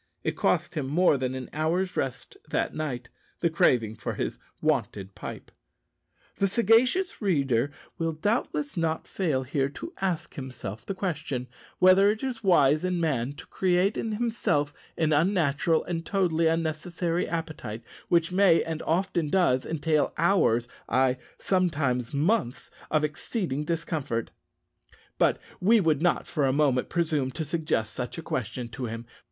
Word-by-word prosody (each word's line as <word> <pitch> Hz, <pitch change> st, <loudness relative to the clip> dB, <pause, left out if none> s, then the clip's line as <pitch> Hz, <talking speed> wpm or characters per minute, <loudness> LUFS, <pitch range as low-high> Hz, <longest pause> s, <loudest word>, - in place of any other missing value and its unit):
It -, -, -1 dB
cost -, -, +1 dB
him 145 Hz, -4 st, -2 dB
more 170 Hz, +3 st, +4 dB
than 130 Hz, -1 st, -2 dB
an 130 Hz, -1 st, -5 dB
hour's 170 Hz, +5 st, 0 dB
rest 130 Hz, -, -3 dB
that -, -, 0 dB
night, 130 Hz, -6 st, -4 dB, 0.3 s
the 170 Hz, -, +2 dB
craving 115 Hz, -9 st, +3 dB
for 110 Hz, -, -5 dB
his -, -, -3 dB, 0.2 s
wonted 105 Hz, -10 st, -1 dB
pipe. -, -, -8 dB, 0.9 s
The 195 Hz, -, +2 dB
sagacious 235 Hz, -, +3 dB
reader 140 Hz, -, +2 dB, 0.3 s
will 165 Hz, 0 st, 0 dB
doubtless 230 Hz, -, -1 dB
not 165 Hz, -2 st, -1 dB
fail 155 Hz, -9 st, 0 dB
here 135 Hz, +1 st, 0 dB
to 335 Hz, -, -8 dB
ask 180 Hz, -4 st, -1 dB
himself 125 Hz, -6 st, -7 dB
the 195 Hz, -, -2 dB
question, 155 Hz, -9 st, -3 dB, 0.3 s
whether 185 Hz, +2 st, +6 dB
it 215 Hz, +3 st, -1 dB
is 245 Hz, -4 st, -3 dB
wise 155 Hz, -5 st, +4 dB
in 180 Hz, -1 st, 0 dB
man 140 Hz, -5 st, 0 dB
to -, -, -11 dB
create 185 Hz, +2 st, +1 dB
in 225 Hz, -1 st, -2 dB
himself 210 Hz, -11 st, 0 dB, 0.2 s
an 155 Hz, -1 st, +2 dB
unnatural 160 Hz, -1 st, +2 dB
and 165 Hz, -2 st, -3 dB
totally 170 Hz, -4 st, +1 dB
unnecessary 165 Hz, +2 st, -1 dB
appetite, 155 Hz, -9 st, -4 dB, 0.3 s
which 170 Hz, 0 st, +3 dB
may, 180 Hz, -3 st, +5 dB
and 160 Hz, -1 st, -4 dB
often 175 Hz, -1 st, 0 dB
does, 145 Hz, -7 st, +2 dB
entail 155 Hz, -1 st, +1 dB
hours 155 Hz, -, +3 dB, 0.2 s
ay, 130 Hz, 0 st, +3 dB, 0.2 s
sometimes 145 Hz, -10 st, 0 dB
months 145 Hz, -, 0 dB, 0.2 s
of 155 Hz, -1 st, +2 dB
exceeding 150 Hz, -, -2 dB
discomfort; 150 Hz, -8 st, -2 dB, 0.9 s
but -, -, +4 dB, 0.2 s
we 220 Hz, +5 st, +5 dB
would 160 Hz, -6 st, +2 dB
not 175 Hz, 0 st, +2 dB
for 145 Hz, -4 st, 0 dB
a -, -, +3 dB
moment 135 Hz, -3 st, +2 dB
presume 155 Hz, -6 st, 0 dB
to 160 Hz, +4 st, -4 dB
suggest 155 Hz, -, -1 dB
such 125 Hz, +4 st, -5 dB
a 165 Hz, -, -6 dB
question 125 Hz, -1 st, -3 dB
to 125 Hz, +2 st, -5 dB
him. 115 Hz, +1 st, -6 dB
160 Hz, 150 wpm, -27 LUFS, 135-180 Hz, 0.9 s, whether